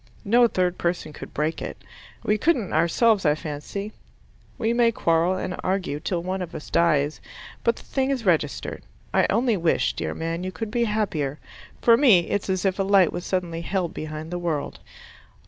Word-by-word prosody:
No 240 +4 +5
third 180 -4 0
person 170 -3 -2
could - - -9
break 155 +2 -2
it. - - -5 0.5
We 210 0 +1
couldn't 255 - +1
ourselves, 190 +6 +3
I 150 -3 +3
fancy. 155 +8 -6 0.6
We 225 +1 +1
may 235 -1 +4
quarrel 170 -2 +2
and 185 0 -3
argue 185 -6 -1
till 170 +1 -2
one 185 +1 -2
of 180 - -6
us 155 - -8
dies, 155 -3 +2 0.4
but 235 - +3
the - - -13
thing 265 -1 -1
is 260 -5 -1
registered. 160 -5 0 0.3
I - - +4
only 230 0 +2
wish, 170 -2 +1
dear - - -4
man, 165 +2 -3
you 185 - -3
could 220 +2 -5
be 235 +1 +1
happier. 175 -10 -1 0.5
For 230 -1 +7
me, 215 -12 +5
it's 205 -1 -1
as 185 0 0
if 190 0 +1
a - - +3
light 195 -3 +4
was 175 - -5
suddenly 175 -3 -2
held 180 -1 -2
behind 155 0 -6
the 175 - -2
world. 165 -4 -3
185 Hz, 185 wpm, -24 LUFS, 165-210 Hz, 0.6 s, For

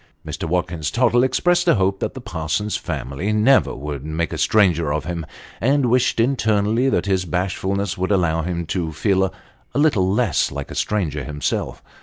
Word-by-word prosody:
Mr. - - -5
Watkins 85 -3 -1
Tottle 120 +3 +3
expressed 175 +6 +2
a 170 - +5
hope 95 -1 +1
that - - -3
the 130 - -7
Parsons 80 +2 -2
family 70 +11 -3
never 110 +6 +3
would 70 0 -6
make 80 +2 -2
a - - -3
stranger 85 -8 +3
of 75 0 -2
him; 85 -2 -4 0.3
and 135 0 +2
wished 125 -1 +2
internally 115 -1 +2
that 90 -8 0
his 95 -2 +1
bash 90 +2 -2
fulness 100 -1 -2
would 95 - -1
allow 85 -4 +2
him 85 0 -3
to 85 -1 -2
feel 95 +4 +2
a 95 - -5 0.4
little 120 -12 +3
less 105 - +1
like 70 0 -6
a - - -5
stranger 80 -9 -1
himself. 75 +2 -3
95 Hz, 180 wpm, -21 LUFS, 80-110 Hz, 0.4 s, a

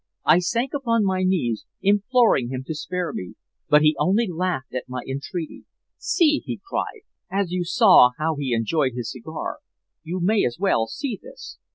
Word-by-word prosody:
I 175 - +6
sank 235 +8 -1
upon 230 -6 +1
my 190 -1 0
knees 175 - 0 0.2
imploring 205 - +3
him 130 0 -4
to 160 - -4
spare 175 +3 -4
me, 90 - -6 0.3
but 150 0 +5
he 155 0 +4
only 200 +9 +2
laughed 175 -7 -3
at 125 0 -5
my 125 0 -4
entreaty. 150 +5 -5 0.3
'See!' 305 -4 +2
he - - -5
cried, - - -3 0.3
'as 195 -2 -1
you 180 0 -1
saw 165 -7 +6
how 160 +1 -1
he 140 -3 -3
enjoyed 130 +3 0
his 120 -2 -4
cigar, 155 +6 -6 0.4
you 175 +3 -4
may 200 +4 +2
as 120 - -1
well 185 - +2
see 235 - -4
this!' - - -12
175 Hz, 175 wpm, -23 LUFS, 135-200 Hz, 0.4 s, I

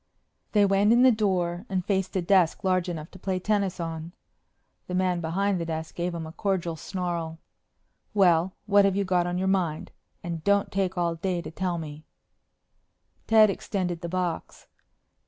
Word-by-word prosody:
They 205 -2 +5
went 200 +2 +3
in 240 +2 +5
the 260 - +7
door 185 -3 0
and 185 -2 -1
faced 190 -2 -1
a 185 - +1
desk 180 -2 +3
large 185 -1 +1
enough 160 -2 -6
to 190 - -13
play 190 0 -1
tennis 200 -1 0
on. 165 0 -5 0.7
The 180 - -3
man 180 -1 +1
behind 185 +3 0
the - - -2
desk 160 0 -4
gave 175 0 -2
them 165 -1 -4
a 160 - -8
cordial 175 -2 -1
snarl. 170 -1 -4 0.8
"Well, 180 -2 +4
what 205 -1 +5
have 195 -1 +2
you 200 - +1
got 180 -2 +1
on 175 0 -2
your 190 +1 0
mind? 180 -5 0 0.3
And 170 -2 -5
don't 200 +1 +2
take 190 -1 -1
all 170 -1 +1
day 175 +2 -2
to - - -7
tell 180 0 -2
me." 155 -1 -7 1.2
Ted 215 -2 +6
extended 180 -4 -3
the 170 - -4
box. 180 -2 -3
180 Hz, 175 wpm, -26 LUFS, 170-195 Hz, 1.2 s, the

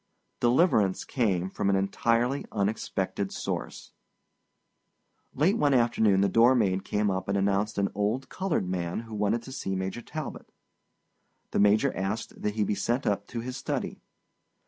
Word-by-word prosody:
Deliverance 120 - +3
came 95 -9 0
from 100 +1 -1
an 100 - +3
entirely 115 +7 +1
unexpected 100 -2 -2
source. - - -5 1.4
Late 185 - +2
one 145 -2 +3
afternoon 110 -5 +3
the 100 - +4
door 115 +6 +5
maid 95 -5 +1
came 105 -1 0
up 95 0 -3
and 100 0 +1
announced 100 +2 0
an 100 0 +1
old 105 +6 -1
colored 185 - -1
man 90 +1 -2
who 115 -1 -11
wanted 105 +3 0
to 130 - -10
see 115 -8 -3
Major 95 +5 -3
Talbot. 155 +3 -7 1.0
The - - 0
Major 105 +7 +4
asked 95 +4 -4
that 105 0 -1
he 110 - +1
be 105 - 0
sent 120 +7 -1
up 100 0 0
to 115 - -5
his 125 +2 -5
study. - - -3
105 Hz, 155 wpm, -28 LUFS, 95-120 Hz, 1.4 s, door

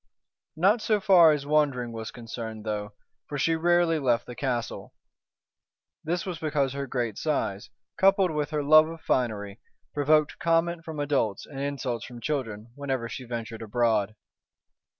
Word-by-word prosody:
Not 195 +8 +3
so 215 -1 +2
far 180 -5 +7
as 145 -2 -1
wandering 140 -5 +1
was 110 -1 -6
concerned, 115 -2 -7
though, 105 -1 -3 0.3
for 145 - -4
she 165 +4 +2
rarely 170 0 +3
left 120 -4 +1
the 125 - -8
castle. 120 -2 -3 1.1
This 170 +2 -2
was 180 -4 -4
because 145 -4 0
her 140 0 -4
great 120 -4 -2
size, 105 -10 -2 0.3
coupled 195 -2 +4
with 150 -1 -2
her 150 -2 -1
love 155 +2 +7
of 165 0 -8
finery, 105 -7 -1 0.3
provoked 150 +1 +2
comment 165 0 +1
from 160 -3 -7
adults 135 -9 0
and 135 - -9
insults 135 -4 -3
from 120 -1 -9
children 115 -6 -3
whenever 135 -3 -3
she 125 - -7
ventured 115 -2 -6
abroad. 110 -2 +1
140 Hz, 150 wpm, -27 LUFS, 115-160 Hz, 1.1 s, far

